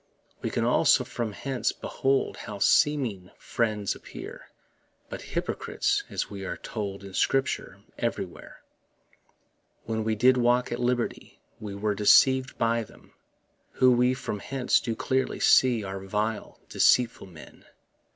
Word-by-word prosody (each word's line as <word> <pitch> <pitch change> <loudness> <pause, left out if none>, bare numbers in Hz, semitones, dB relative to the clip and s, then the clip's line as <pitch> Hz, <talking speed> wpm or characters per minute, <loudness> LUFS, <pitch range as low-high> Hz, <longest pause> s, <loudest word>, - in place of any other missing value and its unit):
We - - -2
can - - -1
also - - +4
from 115 -2 -4
hence 130 +4 -2
behold 135 0 -1
How 105 -2 -7
seeming 120 - +2
friends 105 -4 -1
appear - - -10 0.6
But - - -7 0.2
hypocrites, - - -1
as - - -3
we 100 -1 -8
are - - -4
told 100 -3 -6
In 100 -1 -10
Scripture 135 +7 -1 0.2
everywhere. - - -5 1.2
When 110 -1 -2
we 110 0 0
did 125 +4 +4
walk 125 +1 +2
at 120 - -3
liberty 120 -1 -2 0.2
We 105 -2 -7
were 105 +1 -1
deceiv'd 130 +6 +4
by 115 0 +1
them, 110 - -14 0.6
Who 130 0 +4
we 125 +1 +3
from 105 -5 -5
hence 130 +4 +1
do 115 -2 -3
clearly 130 +3 -1
see 125 -4 +4
Are 95 0 -5
vile, 105 +3 -3
deceitful 120 -4 +2
men. 80 -4 -15
115 Hz, 135 wpm, -27 LUFS, 105-125 Hz, 1.2 s, also